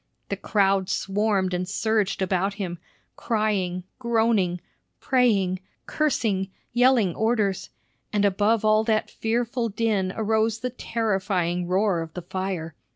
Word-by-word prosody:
The - - -1
crowds 195 -2 +1
swarmed 195 -1 0
and 180 0 -2
surged 210 -2 0
about 190 +1 0
him, 180 -5 -4 0.4
crying, 200 -5 -1 0.2
groaning, 225 -7 +1 0.4
praying, 205 -8 +2 0.3
cursing, 220 -10 0 0.2
yelling 240 -6 +4
orders; 215 -3 0 0.4
and 205 -1 +2
above 205 +3 +2
all 215 0 +4
that 220 -1 0
fearful 235 +1 -1
din 205 -3 0
arose 220 0 +1
the 250 +1 -2
terrifying 190 -7 -1
roar 185 -1 +1
of 160 -1 -8
the 180 - -5
fire. 180 -3 -4
205 Hz, 120 wpm, -25 LUFS, 185-225 Hz, 0.4 s, yelling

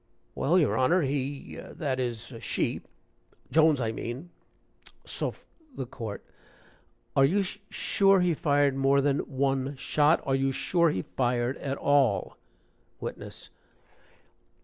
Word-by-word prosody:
"Well, 170 +6 +2
your 160 -6 +3
Honor 165 +7 +3
he 140 0 -3
that 135 -5 -3
is, 120 0 -3
she - - -1 0.7
Jones, 155 -3 +5
I 115 -3 0
mean 125 +9 -6 0.7
Soph - - -4
" 310 -5 -27
THE 130 - -3
COURT. 115 -4 -7 0.9
"Are 135 - +5
you 190 +9 +3
sure 195 0 +1
he 180 -1 +2
fired 145 -2 +2
more 135 +1 +3
than 140 0 +2
one 135 0 -1
shot? 150 +4 +2
Are 135 - 0
you 135 0 +2
sure 170 +5 +2
he 95 -11 -2
fired 120 0 0
at 135 0 -3
all?" 140 -7 +2 0.6
WITNESS. - - -7
140 Hz, 125 wpm, -28 LUFS, 130-160 Hz, 0.9 s, Jones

